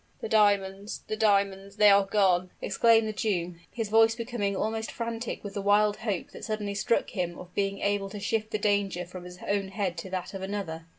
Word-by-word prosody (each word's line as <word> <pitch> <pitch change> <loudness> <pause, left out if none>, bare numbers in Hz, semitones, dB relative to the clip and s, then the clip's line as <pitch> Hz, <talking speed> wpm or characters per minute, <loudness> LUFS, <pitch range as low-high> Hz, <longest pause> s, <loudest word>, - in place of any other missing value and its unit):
"The - - -4
diamonds, 200 -1 +1
the 215 - -2
diamonds, 200 -2 +1
they 210 -1 +7
are 200 0 +5
gone!" 185 -3 +2
exclaimed 225 -1 +3
the 215 - -3
Jew, 180 -5 -1 0.2
his 225 -3 -4
voice 225 +1 +5
becoming 230 -4 -2
almost 220 +2 -2
frantic 230 0 -4
with 200 -1 -6
the 200 - -3
wild 205 +1 +3
hope 205 -5 -3
that - - -11
suddenly 215 -2 -3
struck 205 +3 0
him 175 -5 -3
of 180 0 -11
being 200 0 0
able 200 -1 0
to 205 +1 -7
shift 215 +1 -1
the 215 - -1
danger 200 -3 0
from 180 0 -10
his 180 0 -10
own 200 -1 0
head 190 -3 -2
to 190 - -7
that 185 +1 -4
of 195 - -6
another. 190 -5 -4
200 Hz, 210 wpm, -28 LUFS, 190-215 Hz, 0.2 s, they